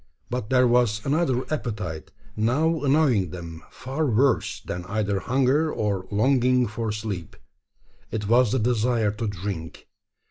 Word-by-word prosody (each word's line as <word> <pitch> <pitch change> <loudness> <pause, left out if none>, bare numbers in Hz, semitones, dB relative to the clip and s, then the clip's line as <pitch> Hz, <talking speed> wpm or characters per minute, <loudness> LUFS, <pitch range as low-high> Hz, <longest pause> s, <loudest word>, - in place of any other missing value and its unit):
But 120 -3 -3
there 130 -1 +4
was 120 -3 +2
another 140 -3 +1
appetite 100 - -4 0.3
now 145 +9 +1
annoying 135 - +3
them 85 -1 -8
far 140 +4 -3
worse 130 +2 +1
than 90 0 -6
either 100 0 -1
hunger 135 - +1
or 100 -3 -2
longing 125 +3 +3
for 110 0 -3
sleep. 105 -6 -5 0.7
It 105 -2 -3
was 120 0 +4
the 130 - +2
desire 115 -2 +1
to 110 +2 -4
drink. 95 -4 -6
115 Hz, 135 wpm, -25 LUFS, 100-130 Hz, 0.7 s, there